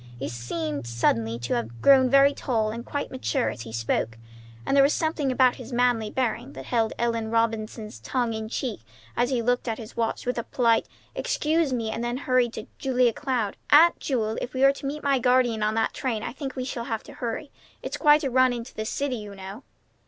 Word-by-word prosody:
He 140 +3 -4
suddenly 145 +5 -4
seemed 115 0 0
to 120 - -1
have 115 0 -3
grown 260 - +6
very 275 +2 +6
tall 220 -6 -1
and 235 +2 -6
quite 285 +3 -4
mature 260 0 -1
as 115 - -8
he 115 -1 -8
spoke, 115 0 -1 0.5
and - - +1
there 280 - +7
was 280 - +3
something 315 -4 0
about 255 -1 +3
his 250 0 -9
manly 240 -3 +2
bearing 245 +2 -2
that - - -9
held 225 -2 +1
Ellen 230 -1 -1
Robinson's 225 -1 -1
tongue 245 -3 -1
in 220 0 -4
check 240 -2 -3 0.4
as 245 - +1
he 250 -3 0
looked 245 +1 +1
at 225 -1 -1
his 220 -1 -10
watch 230 -1 -2
with 250 -1 -1
a - - -3
polite 230 -2 +2 0.3
"Excuse 310 -1 0
me," 230 -3 -1
and 230 - -3
then 240 +3 -2
turned 250 -2 +2
to 220 - -6
Julia 250 -3 +2
Cloud. 250 -7 -2
"Aunt 325 +4 +7
Jewel, 225 -5 -1
if 255 - -5
we 260 - +1
are 275 0 +7
to 275 - -6
meet 300 +2 -4
my 280 -2 +2
guardian 250 -3 +3
on 215 +1 +1
that 225 0 +1
train, 230 -5 -2
I - - -4
think 270 -1 -6
we 255 -1 -3
shall 235 -2 -4
have 225 -2 -3
to - - -12
hurry. 250 +4 -4 0.3
It's - - -3
quite 300 0 +5
a 270 - -1
run 255 0 +4
into 235 0 -6
the 215 - -4
city, 270 +2 -2
you 205 -2 -8
know." 195 +4 -8
240 Hz, 220 wpm, -26 LUFS, 220-260 Hz, 0.5 s, there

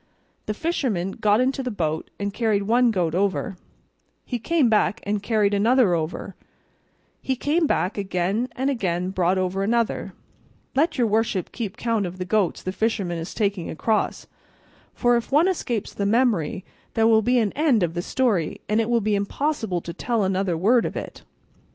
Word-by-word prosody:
The 215 - -2
fisherman 230 - -1
got 210 +2 +2
into 265 +2 +1
the 255 - -3
boat 160 -7 -2
and 200 0 -2
carried 215 -3 +1
one 240 +4 +3
goat 180 -7 0
over; 195 +3 0 0.7
he 245 - -3
came 315 +2 +2
back 210 -3 +2
and 205 0 -1
carried 210 -2 +1
another 225 0 +4
over; 160 -1 -3 0.9
he 265 - -1
came 305 +5 +1
back 195 -3 0
again, 195 +5 -1
and 265 +2 0
again 185 -7 -1
brought 185 0 +1
over 185 +1 -1
another 230 +3 0 0.6
let 305 +6 +1
your 245 - +3
worship 215 -3 0
keep 215 -6 -5
count 225 -5 0
of 175 +1 -8
the 185 - -4
goats 190 -2 0
the 185 - -2
fisherman 195 -4 -1
is 165 - -7
taking 200 -5 -1
across, 215 +7 -1 0.7
for 245 0 +3
if 235 - -5
one 305 +6 +5
escapes 245 - -2
the 200 - -1
memory 220 - +1 0.3
there 225 -1 +3
will 225 -1 +5
be 245 +3 +2
an 220 -4 +2
end 275 - +2
of 165 -1 -1
the 175 - -2
story, 205 -7 0
and 215 +2 +2
it 225 - -2
will 235 -1 +2
be 210 0 0
impossible 205 - -1
to 170 - -7
tell 230 +4 -1
another 190 -2 0
word 225 +8 +4
of - - -4
it. - - -6
210 Hz, 180 wpm, -24 LUFS, 185-240 Hz, 0.9 s, one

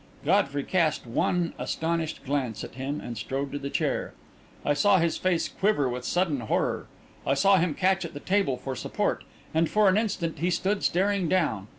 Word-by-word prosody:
Godfrey 145 -5 +2
cast 165 -6 +1
one 165 +8 0
astonished 160 -1 -2
glance 130 -5 -2
at - - -8
him 135 +4 -3
and 120 - -6
strode 135 +5 -3
to 145 - -3
the 140 0 -4
chair. - - -1 0.5
I 145 - +3
saw 195 +7 +4
his 170 -2 +1
face 185 -3 +1
quiver 190 -9 +1
with 125 0 -4
sudden 175 -4 +1
horror, 110 - -1 0.4
I 135 - +1
saw 195 +8 +5
him 165 -4 +1
catch 190 0 +2
at 170 -3 -7
the - - -5
table 190 -7 +1
for 130 +1 -5
support, - - -1 0.3
and 160 0 +2
for 210 -1 +4
an 190 +3 +4
instant 175 -8 -2
he 175 +3 +1
stood 190 +3 0
staring 190 -1 +1
down. 110 - +1
165 Hz, 190 wpm, -27 LUFS, 140-185 Hz, 0.5 s, saw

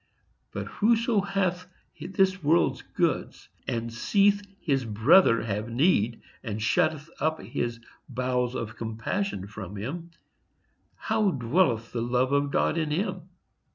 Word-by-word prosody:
—But - - -4
whoso 225 0 +2
hath 185 -2 -1 0.3
this 190 0 +1
world's 160 +4 +2
goods - - -2 0.2
and 115 -1 -2
seeth 200 - +3 0.2
his 135 -4 0
brother 115 - +4
have 105 +1 -3
need 120 - +2 0.2
and 110 -3 -4
shutteth 155 +5 +1
up 155 0 0
his 120 -1 -3 0.3
bowels 125 -1 -1
of 110 -1 -4
compassion 115 - -3
from 100 -1 -8
him, 155 - -5 0.9
how 220 -2 +1
dwelleth 120 -5 +1
the 120 - -2
love 125 +2 +1
of 140 0 +2
God 160 +3 +1
in 155 -2 -1
him? 185 +2 -2
140 Hz, 125 wpm, -27 LUFS, 115-185 Hz, 0.9 s, brother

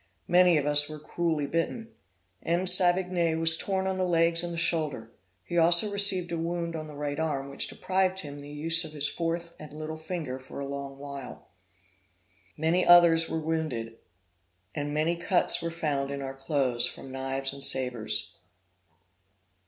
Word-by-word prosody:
Many 180 -1 +4
of 145 - -1
us 145 0 +4
were 155 - -7
cruelly 160 0 -2
bitten. 165 +10 -3 0.5
M. 175 +2 -1
Savigny 180 -2 +3
was 165 0 +6
torn 190 +3 -2
on 190 0 -2
the - - +1
legs 165 -1 +2
and 175 - -4
the 170 - -6
shoulder; 155 -9 -1 0.3
he 175 - -1
also 175 +5 +6
received 200 -3 +3
a 170 - -3
wound 170 0 -3
on 155 -1 -6
the 150 - -11
right 145 0 -4
arm 140 -4 -2
which - - 0
deprived 190 0 -1
him 145 -4 -9
of - - -10
the 145 - -11
use 160 +3 +2
of 155 -1 -8
his 150 -1 +1
fourth 170 0 -4
and 155 -1 -10
little 155 +1 -6
finger 155 -5 -6
for 130 - -10
a 140 - -4
long 140 0 -7
while. 140 -2 -10 1.1
Many 165 +4 +1
others 170 -2 +6
were - - -2
wounded; 155 -8 -4 0.7
and 145 0 -4
many 155 +3 0
cuts 175 0 +1
were 170 - -3
found 145 -4 -2
in 140 0 -5
our 135 0 -5
clothes 135 -3 0
from 135 - -10
knives 135 +1 -2
and 140 0 +2
sabres. 125 -6 -1
160 Hz, 175 wpm, -27 LUFS, 140-170 Hz, 1.1 s, was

